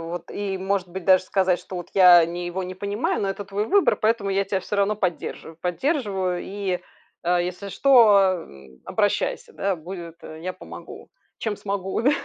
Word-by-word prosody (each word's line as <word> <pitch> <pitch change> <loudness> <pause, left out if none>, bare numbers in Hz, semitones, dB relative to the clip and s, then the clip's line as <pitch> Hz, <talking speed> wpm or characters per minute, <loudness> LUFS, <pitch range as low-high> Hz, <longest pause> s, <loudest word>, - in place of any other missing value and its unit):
вот 175 -1 -6
и 195 -2 -3
может 190 -1 -1
быть, 180 0 -7
даже 185 -1 +5
сказать, 185 -2 +1
что 185 - -9
вот 175 - -6
я 180 -3 +8
ни 175 +1 -5
его 175 +2 -3
не 185 0 -6
понимаю, 205 +3 -2
но 195 - 0
это 200 +1 -5
твой 200 +2 -2
выбор, 400 -1 +3
поэтому 220 -2 +1
я 195 +1 +1
тебя 195 -1 -1
всё 205 - -4
равно 200 +1 +2
поддерживаю. 170 -3 -4
Поддерживаю 190 - -1
и, 195 -2 -3 0.4
а, 175 +1 +2
если 180 +3 -4
что, 235 -7 +6 0.2
ам, 65 - -16
обращайся, 475 - -1
да, 195 -1 -1
будет, 170 0 -8
я 160 +4 -6
помогу, - - -11 0.3
чем 215 -3 -2
смогу, 195 +1 -3
да. 275 - +4
190 Hz, 180 wpm, -24 LUFS, 180-205 Hz, 0.4 s, я